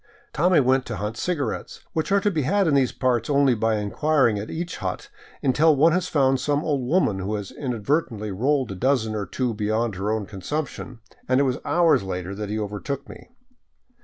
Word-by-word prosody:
Tommy 170 +4 +4
went 130 -1 +2
to 115 - -4
hunt 105 +2 -4
cigarettes 155 +2 -3
— - - -41
which 160 +4 -2
are 200 - +5
to 205 - +1
be 160 -5 0
had 195 +8 +2
in 155 - +2
these 135 -3 +3
parts 125 -2 0
only 140 -2 +4
by 115 0 +1
inquiring 115 +2 +1
at 105 - -6
each 170 +2 -4
hut 415 0 -4 0.3
until 150 +3 +4
one 155 +4 +5
has 180 +1 0
found 135 -4 +2
some 145 +2 0
old 145 -5 0
woman 125 - +1
who 100 +3 -2
has 105 -2 -5
inadvertently 120 -3 -2
rolled 130 +4 0
a - - -5
dozen 120 0 +1
or 105 -2 -3
two 125 -3 -2
beyond 110 +1 -1
her 100 +3 -2
own 110 -2 -1
consumption 125 - -5
— - - -32
and 130 +1 +4
it - - +4
was 130 -2 0
hours 170 -6 +3
later 90 0 -4
that 105 0 -5
he 105 - -2
overtook 110 +7 -4
me. - - -12
130 Hz, 210 wpm, -24 LUFS, 105-150 Hz, 0.3 s, are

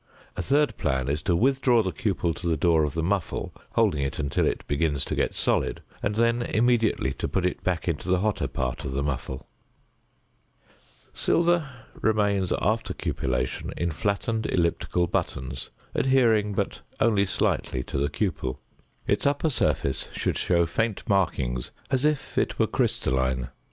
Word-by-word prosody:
A - - -2
third 145 +8 +2
plan 65 -3 0
is 75 +2 0
to 85 +3 +1
withdraw 125 +1 +3
the 95 - -1
cupel 90 -6 -1
to 85 - -5
the 80 -2 +2
door 80 +1 +3
of 75 - -4
the 80 - 0
muffle, 95 0 -1 0.2
holding 75 - +2
it 70 -1 -2
until 70 -2 +1
it - - -2
begins 70 -1 0
to - - -3
get - - 0
solid - - 0 0.2
and 105 - -1
then 115 +1 +2
immediately 115 - +2
to - - -3
put 95 - 0
it 90 - -2
back 90 -2 -1
into 85 +1 -2
the 90 - +4
hotter 105 0 0
part 65 -1 -3
of 65 - -4
the 70 +1 0
muffle. 65 -2 -4 1.7
Silver 170 -3 +2 0.2
remains 105 -4 +1
after 110 +4 0
cupellation 65 -1 -2
in 85 -1 0
flattened 110 +5 -1
elliptical 85 0 +1
buttons, 65 -5 -3 0.2
adhering 115 -6 +3
but - - -2 0.2
only 105 -4 +3
slightly 65 -7 0
to 70 - -3
the 70 +1 +1
cupel. 80 -12 -2 0.5
Its - - +1
upper 145 +2 +1
surface 70 - 0
should - - -1
show 85 -1 +2
faint 110 +6 -2
markings 65 -11 0 0.2
as 130 +1 +2
if 150 -2 0
it - - -1
were - - +4
crystalline. 65 -1 0
90 Hz, 160 wpm, -26 LUFS, 70-110 Hz, 1.7 s, the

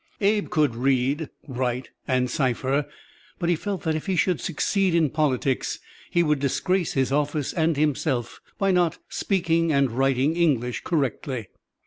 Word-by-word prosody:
Abe 205 0 +1
could 150 -7 +2
read, 135 +4 +1 0.2
write 125 -1 -2 0.2
and 125 -1 +2
cipher, 135 +1 0 0.5
but 175 -2 -1
he 175 - +4
felt 195 0 -4
that 160 - +1
if 155 +3 -4
he 190 - +1
should 180 0 +1
succeed 185 +2 +1
in 160 -4 +3
politics, 135 -4 0 0.3
he 175 - +2
would 150 -3 +1
disgrace 170 +6 0
his 135 -1 +1
office 150 0 0
and 165 -2 +1
himself 140 -5 -1 0.2
by 195 -2 +2
not 175 -2 +2
speaking 165 -4 +1
and 140 -3 +2
writing 135 +4 +1
English 130 -9 +1
correctly. 135 - -2
150 Hz, 150 wpm, -25 LUFS, 130-170 Hz, 0.5 s, he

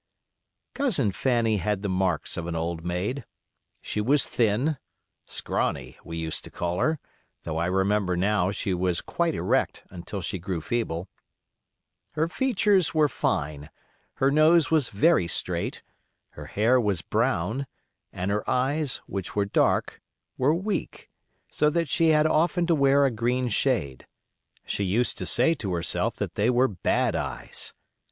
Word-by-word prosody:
Cousin 215 - +1
Fanny 115 -1 +1
had 100 +2 -1
the - - 0
marks 95 -3 0
of 85 0 -4
an 85 - -3
old 80 0 -3
maid. 95 +10 -2 0.6
She 105 - -2
was 140 +6 +3
thin 125 +7 +1 0.5
("scrawny" 60 0 -2
we 85 0 -6
used 80 -1 -3
to - - -9
call 85 +1 -3
her, 155 0 +2 0.5
though 80 -1 -3
I 85 - 0
remember 95 0 +1
now 95 0 +2
she 100 -1 -2
was 90 -1 0
quite 170 -2 -1
erect - - 0
until 90 +2 -6
she 90 +1 -4
grew 90 0 -3
feeble); 95 -2 -2 1.1
her 155 +2 +1
features 205 - +2
were 155 -1 +5
fine; 75 - -2 0.5
her 135 +1 +2
nose 155 0 +4
was 155 -6 +3
very 115 - +3
straight; - - -3 0.5
her - - -10
hair 120 +5 +3
was 100 -6 -1
brown; 115 +2 0 0.4
and 90 +2 -3
her 105 +1 0
eyes, 140 +2 0
which 95 -3 -5
were 100 -1 +2
dark, 100 - +1 0.3
were 140 +5 +2
weak, 195 +4 -4 0.4
so 150 - +2
that 170 +1 0
she 165 +2 +3
had 155 -1 +4
often 170 +2 +2
to 170 - +2
wear 140 -1 +4
a 135 - +2
green 120 +2 0
shade. 105 - 0 0.6
She 100 - -2
used 110 +6 0
to - - -3
say 165 - +3
herself 90 -5 -1
that - - -4
they 105 +4 +1
were 125 +1 +4
"bad 95 -7 0
eyes". - - -3
110 Hz, 150 wpm, -26 LUFS, 90-145 Hz, 1.1 s, were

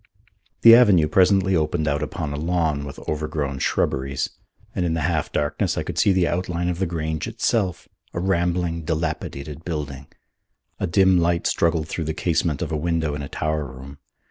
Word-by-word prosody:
The 115 - +10
avenue 100 -10 +6
presently 95 +3 +3
opened 80 0 0
out 75 0 0
upon 75 0 -3
a - - -3
lawn 80 -2 0
with 70 - -8
overgrown 75 -3 -2
shrubberies, 65 +1 -1 0.4
and 90 - -1
in 85 -2 0
the 80 - -1
half 80 -1 -1
darkness 75 0 -1
I - - 0
could - - -4
see 100 - +4
the 90 -2 +2
outline 90 0 -1
of 90 0 -3
the 95 - 0
Grange 80 -2 -3
itself, 95 -7 -1 0.2
a - - -4
rambling, 85 -2 0
dilapidated 75 -2 -3
building. 70 -5 -5 0.7
A - - -1
dim 95 0 +4
light 85 0 +1
struggled 80 -2 +1
through 80 0 -3
the 80 0 -3
casement 80 -4 0
of - - -5
a - - 0
window 80 -1 -1
in 75 - -4
a 70 - -6
tower 75 -1 -1
room. 70 +2 -11
80 Hz, 180 wpm, -23 LUFS, 75-90 Hz, 0.7 s, The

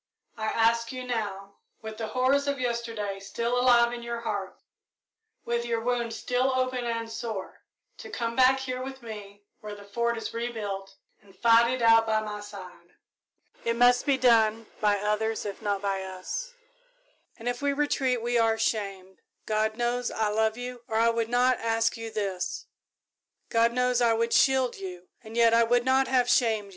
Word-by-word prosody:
I 220 -1 -3
ask 230 +1 +2
you 255 -1 -6
now, 200 -5 -4 0.3
with 220 0 -7
the 225 - -4
horrors 260 +5 +1
of 280 -1 -1
yesterday 230 -5 -3
still 235 +5 -2
alive 240 -1 +4
in 240 - -6
your 235 0 -5
heart, 200 -4 -4 0.9
with 235 0 -1
your 235 -1 -1
wound 240 -1 -1
still 250 +3 0
open 255 -1 -1
and 230 -1 -2
sore, 225 -4 -6 0.4
to - - -9
come 230 -1 -3
back 260 +1 +5
here 255 -1 -4
with 265 0 -7
me, 205 -2 -9 0.2
when 210 -1 -8
the 205 - -12
Fort 235 +3 -1
is 225 - -5
rebuilt, 205 -5 -4 0.3
and 195 -1 -21
fight 230 +2 +5
it 255 -2 -2
out 225 0 +6
by 220 0 +2
my 210 -1 -5
side. 185 -4 -11 0.7
"It 230 0 0
must 245 +2 +4
be 275 -2 +3
done 225 -3 +3
by 205 -1 +2
others 210 +2 -1
if 200 +1 -6
not 205 -2 -2
by 195 -1 -1
us, 460 - -6 0.8
and 230 - -8
if 245 +1 -2
we 285 0 +1
retreat 270 -4 0
we 240 0 +1
are 225 -1 +2
shamed. 195 -4 -3 0.3
God 215 0 0
knows 240 0 -1
I 220 -1 -1
love 220 +1 +1
you, 245 0 -6
or 220 -2 -1
I 230 +1 +4
would 230 -1 -1
not 250 +1 +3
ask 225 0 +1
you 225 -1 -6
this. 195 -4 -3 0.8
God 230 0 +3
knows 250 0 +1
I 235 -1 +4
would 230 +1 0
shield 260 -2 +3
you, 180 -2 -8
and 220 +1 -9
yet 230 -1 +5
I 230 - +5
would 240 +1 +2
not 265 +1 +3
have 255 -2 +3
you - - +4
shamed. 220 -4 +1
230 Hz, 185 wpm, -27 LUFS, 215-245 Hz, 0.9 s, out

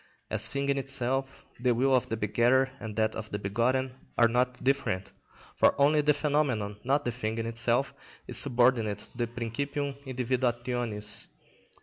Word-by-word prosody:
As - - +3
thing 140 0 -2
in 140 0 +2
itself, 135 0 -2
the 125 -1 +2
will 135 +3 +2
of 125 - 0
the 115 - -2
begetter 120 +5 +2
and 110 -2 -6
that 110 0 +1
of 110 -1 -6
the 105 - -3
begotten 120 +6 0 0.2
are 120 - +6
not 125 +2 0
different, 130 -9 0 0.4
for - - +3
only 150 +2 +5
the 150 0 +4
phenomenon, 130 -9 0
not 140 +3 +1
the 120 - 0
thing 110 -2 -3
in 115 - -2
itself, 115 +3 +1 0.3
is - - -3
subordinate 120 -4 +3
to - - -13
the 120 -1 -1
principim 140 +5 -3
individuationis. 120 -4 -2
125 Hz, 160 wpm, -29 LUFS, 115-135 Hz, 0.4 s, are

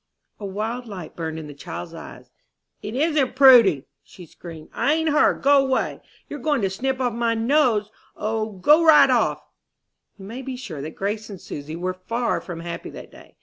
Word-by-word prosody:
A 205 - -6
wild 225 +5 -4
light 185 -7 -9
burned 160 -1 -4
in 160 - -7
the 150 - -9
child's 90 -11 -8
eyes. - - -11 0.5
"It 215 +3 -6
isn't 290 -3 +1
Prudy!" 240 - +6 0.2
screamed 165 -2 -12
she, - - -35
"I 290 - +1
ain't 320 0 0
her! 295 - +4
Go 280 0 +4
'way! 265 -1 -1 0.3
You're 290 - -7
goin' 285 -3 0
to 190 - 0
snip 260 +6 -2
off 245 -3 0
my 230 0 0
nose! 230 -3 +2 0.2
O, 220 0 -3
go 295 - +4
right 315 -2 +7
off!" - - +1 0.7
You 195 - -11
may 230 +6 -7
be 265 0 -6
sure 175 - -7
that 155 +3 -7
Grace 210 +2 -3
and 195 -3 -8
Susy 150 0 -7
were 180 +2 -3
far 230 +6 -2
from 170 -2 -8
happy 170 0 -6
that - - -11
day. - - -17
220 Hz, 190 wpm, -23 LUFS, 180-265 Hz, 0.7 s, right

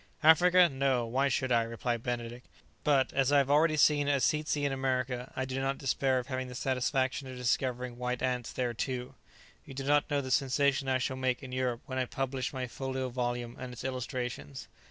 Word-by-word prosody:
"Africa! 175 +3 +7
no; 135 -4 0
why 130 +4 +1
should 130 -1 0
I?" 120 -1 +4
replied 115 +1 -2
Benedict; 120 0 -4 0.4
"but, 140 -3 +2
as 135 0 +2
I 145 - +5
have 140 0 +3
already 155 +1 +4
seen 145 0 +4
a 145 - +3
tzetsy 150 +1 0
in 140 - +1
America, 130 -2 -2
I 130 - -1
do 130 0 -3
not 135 0 -1
despair 135 -1 +1
of 125 - -2
having 130 -1 -3
the 125 - -9
satisfaction 130 +1 0
of 130 -1 -8
discovering 125 0 -1
white 125 0 -2
ants 125 -2 -1
there 125 -2 -2
too. 125 +1 -4 0.5
You 135 - -11
do 135 - -4
not 145 +1 +2
know 145 - +1
the 130 -1 -5
sensation 135 +1 +2
I 130 -1 +2
shall 130 +1 -2
make 130 -1 -1
in 130 - -8
Europe 125 -2 -1
when 130 -1 -3
I 130 - +1
publish 135 0 -3
my 130 -2 -3
folio 130 +1 -4
volume 120 -1 -3
and 130 -1 -6
its 125 - -8
illustrations." 125 - -4
130 Hz, 205 wpm, -30 LUFS, 125-135 Hz, 0.5 s, Africa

